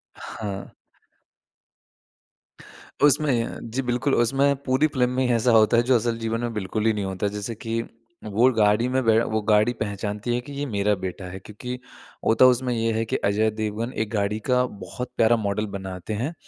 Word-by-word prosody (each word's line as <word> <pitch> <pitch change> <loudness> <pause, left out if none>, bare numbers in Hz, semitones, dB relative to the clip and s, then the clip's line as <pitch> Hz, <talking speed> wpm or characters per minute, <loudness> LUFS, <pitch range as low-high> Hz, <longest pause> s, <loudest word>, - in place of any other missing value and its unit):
हाँ। 100 -3 -6 2.4
उसमें 140 -6 +2
जी, 135 +3 -1
बिल्कुल, 125 +2 0
उसमें 135 +4 +3
पूरी 130 +4 +2
फ़िल्म 125 -4 +1
में 130 +1 0
ही - - 0
ऐसा 115 +1 +2
होता 110 +1 +5
है 120 - +4
जो 130 +1 +3
असल 115 0 0
जीवन 115 +1 -2
में 120 -1 -3
बिल्कुल 105 +1 -2
ही 110 - +4
नहीं 100 -2 -2
होता 95 +1 -3
है। 100 - 0
जैसे 105 +2 -5
कि 115 +1 -3 0.4
वो 110 +5 +3
गाड़ी 105 +3 +3
में 130 0 +1
बै 110 0 +5
वो 110 0 -1
गाड़ी 105 +3 +4
पहचानती 105 +2 -3
है - - 0
कि, 145 - -11
"ये 145 +1 -3
मेरा 105 -3 +1
बेटा 90 +1 -5
है।" 95 - -7
क्योंकि 125 +6 -7 0.5
होता 115 +3 +6
उसमें 125 0 -2
ये 115 0 0
है 110 +1 0
कि - - -2
अजय 110 +2 +2
देवगन 110 +4 -3
एक 105 - -9
गाड़ी 105 +1 0
का 125 0 +4 0.2
बहुत 125 +7 -6
प्यारा 115 +1 +5
मॉडल 105 0 -1
बनाते 95 +2 -6
हैं 130 +10 -2
115 Hz, 190 wpm, -24 LUFS, 105-125 Hz, 2.4 s, होता